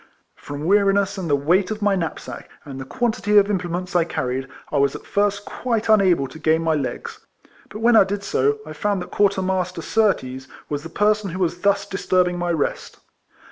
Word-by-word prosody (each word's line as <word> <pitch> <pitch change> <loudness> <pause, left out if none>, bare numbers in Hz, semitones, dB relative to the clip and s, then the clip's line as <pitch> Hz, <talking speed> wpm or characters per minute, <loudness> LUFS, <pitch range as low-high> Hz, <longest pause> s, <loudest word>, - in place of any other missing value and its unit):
From 145 +1 -8
wx'ariness, 200 0 +2
and 175 -3 -4
the 145 - +4
weight 175 +7 +2
of 215 -1 -4
my 205 -1 +3
knapsack, 170 -4 -5 0.2
and 135 -2 -7
the - - -6
quantity 215 - 0
of 205 0 +5
implements 180 -1 -3
I 175 - +5
carried, 130 -5 -3 0.2
I 145 - +1
was 140 0 +2
at - - -9
first 205 0 0
quite 230 -3 -2
unable 185 -10 +4
to 160 - -11
gain 160 +1 +2
my 160 -1 +2
legs; 425 - -4 0.5
but 215 - -8
when 235 +1 +4
I 220 - +8
did 200 +1 -4
so, 145 -5 +1
I 155 - -8
found 200 +2 -1
that - - -13
Quarter 200 -2 +2
master 185 -2 -2
Surtees 135 - 0 0.2
was 145 -1 -2
the 165 - -9
person 210 +2 +1
who 180 - -5
was 175 -1 -1
thus 200 +1 +2
disturbing 180 -2 0
my 175 0 -1
rest. 160 -4 -2
185 Hz, 200 wpm, -22 LUFS, 160-205 Hz, 0.5 s, I